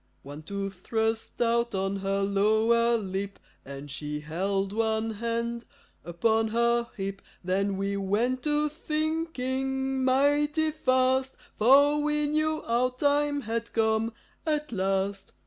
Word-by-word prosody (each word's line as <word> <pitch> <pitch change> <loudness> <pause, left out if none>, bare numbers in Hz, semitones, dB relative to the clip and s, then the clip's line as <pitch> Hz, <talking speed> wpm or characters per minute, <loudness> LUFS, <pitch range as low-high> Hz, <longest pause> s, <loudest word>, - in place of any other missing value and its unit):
One 145 +2 -9
tooth 195 +2 -5
thrust 225 +2 -2
out 235 -1 +1
on 195 +1 -1
her 195 0 -1
lower 220 +4 +3
lip, 195 -1 -4 0.3
And 140 +1 -9
she 150 +1 -4
held 195 +5 -2
one 220 0 0
hand 235 +2 -3 0.4
upon 220 +7 +1
her 235 +1 +1
hip. 195 0 -4 0.2
Then 195 +2 0
we 200 +1 -1
went 220 +7 0
to 300 +1 +1
thinking 270 -4 -2
mighty 290 +4 +2
fast, 260 -2 +1 0.2
For 285 +6 +5
we 300 0 +1
knew 310 +1 0
our 240 +2 +1
time 285 +2 +1
had 230 0 -4
come 220 0 +1 0.3
at 300 -3 -1
last. 195 -1 -1
230 Hz, 125 wpm, -27 LUFS, 195-265 Hz, 0.4 s, For